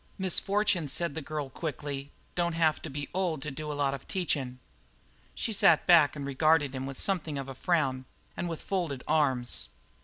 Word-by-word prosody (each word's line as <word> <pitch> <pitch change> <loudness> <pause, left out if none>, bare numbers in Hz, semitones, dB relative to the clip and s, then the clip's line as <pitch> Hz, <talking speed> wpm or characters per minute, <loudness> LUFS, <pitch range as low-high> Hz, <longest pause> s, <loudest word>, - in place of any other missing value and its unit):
"Misfortune," 195 -2 +1
said 170 +2 0
the 160 - -4
girl 150 -2 -4
quickly, 145 -2 -4 0.2
"don't 170 -1 0
have 160 -2 +2
to 160 - -6
be 145 +1 -4
old 175 -6 -1
to 150 - -4
do 150 +2 -5
a - - -3
lot 140 -1 +1
of 135 - -7
teachin'." 140 -9 -1 0.8
She 225 - -1
sat - - +5
back 165 -5 +6
and 140 -2 -5
regarded 145 0 +3
him 130 0 -4
with 135 -1 -6
something 165 -7 -1
of 135 -1 -4
a 135 - -6
frown 135 -4 0 0.3
and 175 - -3
with 165 - -5
folded 170 -9 -2
arms. 130 - +1
150 Hz, 185 wpm, -29 LUFS, 135-170 Hz, 0.8 s, back